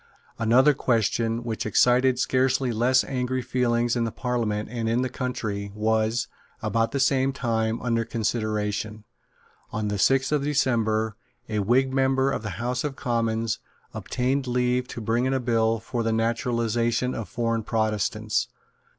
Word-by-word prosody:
Another 125 Hz, +6 st, +5 dB
question, 115 Hz, -2 st, 0 dB
which 115 Hz, -2 st, -3 dB
excited 125 Hz, +4 st, +3 dB
scarcely 130 Hz, 0 st, +1 dB
less 125 Hz, +3 st, +3 dB
angry 130 Hz, -1 st, -2 dB
feeling 120 Hz, -1 st, +1 dB
in 115 Hz, -1 st, 0 dB
Parliament 110 Hz, -3 st, -2 dB
and 115 Hz, -1 st, -3 dB
in 120 Hz, +2 st, +1 dB
the 130 Hz, -, -1 dB
country, 110 Hz, -6 st, -4 dB
was, 110 Hz, +2 st, +1 dB, 0.3 s
about 115 Hz, 0 st, 0 dB
the 140 Hz, -, -1 dB
same 135 Hz, 0 st, +3 dB
time, 115 Hz, -3 st, -1 dB
under 115 Hz, -2 st, +1 dB
consideration. 110 Hz, -2 st, -2 dB, 0.7 s
On 110 Hz, -2 st, -2 dB
the 105 Hz, -1 st, -2 dB
sixth 135 Hz, +7 st, +3 dB
of 150 Hz, -2 st, +1 dB
December, 110 Hz, -7 st, +1 dB, 0.3 s
a 110 Hz, -1 st, -1 dB
Whig 130 Hz, +6 st, +2 dB
member 135 Hz, 0 st, +2 dB
of -, -, -2 dB
the 105 Hz, -5 st, -5 dB
House 125 Hz, +2 st, -2 dB
of 145 Hz, -2 st, -3 dB
Commons 115 Hz, -2 st, -1 dB, 0.3 s
obtained 130 Hz, +2 st, -1 dB
leave 125 Hz, 0 st, +1 dB
to 120 Hz, -, -7 dB
bring 115 Hz, +3 st, +1 dB
in 135 Hz, +1 st, +1 dB
a -, -, +1 dB
bill 115 Hz, -2 st, +1 dB
for 115 Hz, +2 st, -3 dB
the 115 Hz, 0 st, 0 dB
Naturalisation 115 Hz, +1 st, 0 dB
of 115 Hz, -, -5 dB
Foreign 115 Hz, -1 st, -1 dB
Protestants. 110 Hz, -2 st, 0 dB
120 Hz, 150 wpm, -25 LUFS, 110-125 Hz, 0.7 s, Another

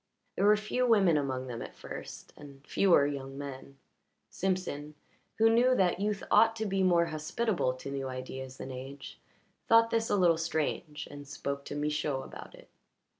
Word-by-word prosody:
There -, -, +1 dB
were 210 Hz, 0 st, +6 dB
few 250 Hz, +4 st, 0 dB
women 200 Hz, -8 st, +5 dB
among 130 Hz, -3 st, -1 dB
them 120 Hz, -2 st, -6 dB
at -, -, -8 dB
first -, -, -9 dB
and 140 Hz, -1 st, -13 dB
fewer 175 Hz, -7 st, +4 dB
young 135 Hz, -1 st, -4 dB
men; 140 Hz, -1 st, -8 dB, 0.5 s
Simpson, 180 Hz, -6 st, -2 dB, 0.4 s
who 225 Hz, -, +5 dB
knew 240 Hz, +3 st, +4 dB
that 180 Hz, -4 st, +2 dB
youth 205 Hz, 0 st, -1 dB
ought 225 Hz, 0 st, +5 dB
to 220 Hz, -1 st, -3 dB
be 195 Hz, -1 st, 0 dB
more 175 Hz, -2 st, +4 dB
hospitable 155 Hz, -, -1 dB
to 140 Hz, +2 st, -7 dB
new 135 Hz, -1 st, -3 dB
ideas 130 Hz, 0 st, -6 dB
than 135 Hz, -, -7 dB
age, 135 Hz, +2 st, -9 dB, 0.5 s
thought 230 Hz, 0 st, +5 dB
this 225 Hz, 0 st, +1 dB
a -, -, +3 dB
little 175 Hz, -4 st, +4 dB
strange 155 Hz, -1 st, -2 dB
and 145 Hz, 0 st, -10 dB
spoke 140 Hz, 0 st, -4 dB
to -, -, -6 dB
Michaud 150 Hz, -2 st, -1 dB
about -, -, -10 dB
it. -, -, -17 dB
150 Hz, 175 wpm, -30 LUFS, 140-200 Hz, 0.5 s, were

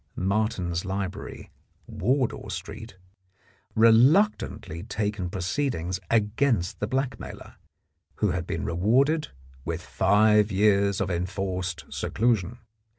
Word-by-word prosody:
Martin's 95 Hz, -3 st, -1 dB
Library, 95 Hz, -1 st, -5 dB, 0.3 s
Wardour 130 Hz, -, -1 dB
Street, 110 Hz, -4 st, -7 dB, 0.8 s
reluctantly 115 Hz, -, +3 dB
taken 105 Hz, -3 st, -3 dB
proceedings 95 Hz, -, -2 dB
against 110 Hz, -3 st, +1 dB
the 105 Hz, -, -1 dB
blackmailer, 130 Hz, +2 st, -4 dB, 0.6 s
who 105 Hz, -3 st, +1 dB
had 90 Hz, -2 st, -3 dB
been -, -, -3 dB
rewarded 130 Hz, -, +2 dB, 0.4 s
with -, -, -4 dB
five 105 Hz, +2 st, +3 dB
years 100 Hz, 0 st, +3 dB
of -, -, -1 dB
enforced 90 Hz, 0 st, -3 dB
seclusion. 115 Hz, -2 st, 0 dB
105 Hz, 90 wpm, -26 LUFS, 95-115 Hz, 0.8 s, reluctantly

